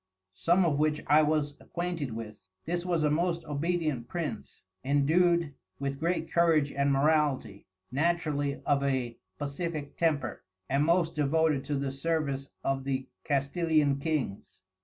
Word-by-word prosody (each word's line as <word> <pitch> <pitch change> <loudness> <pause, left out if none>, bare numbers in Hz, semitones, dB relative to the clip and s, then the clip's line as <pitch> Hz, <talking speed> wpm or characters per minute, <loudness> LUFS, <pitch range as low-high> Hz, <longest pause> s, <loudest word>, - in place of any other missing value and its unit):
Some 175 - +3
of 145 -4 +1
which 150 0 +1
I 150 +1 +6
was 150 -1 +1
acquainted 170 -8 -3
with. 110 -4 -8 0.2
This 175 +1 -1
was 170 -3 +1
a 150 - +3
most 170 +2 0
Obedient 150 -4 -1
Prince, 145 -8 -5 0.2
endued 160 +3 +3 0.2
with 140 0 -3
great 170 +2 -1
Courage 160 -4 +3
and 140 0 +1
Morality, 140 -7 +1 0.2
naturally 145 -1 0
of 140 -1 +2
a 130 -4 -1 0.2
Pacifick 145 - -4
Temper, 145 -8 0 0.2
and 140 +5 +2
most 170 0 +2
devoted 150 -1 +2
to 145 +1 -1
the 135 -1 -1
service 140 -2 -2
of 135 0 0
the 130 -1 -2 0.2
Castilian 145 0 +1
Kings. 140 - -3
150 Hz, 140 wpm, -29 LUFS, 140-165 Hz, 0.2 s, I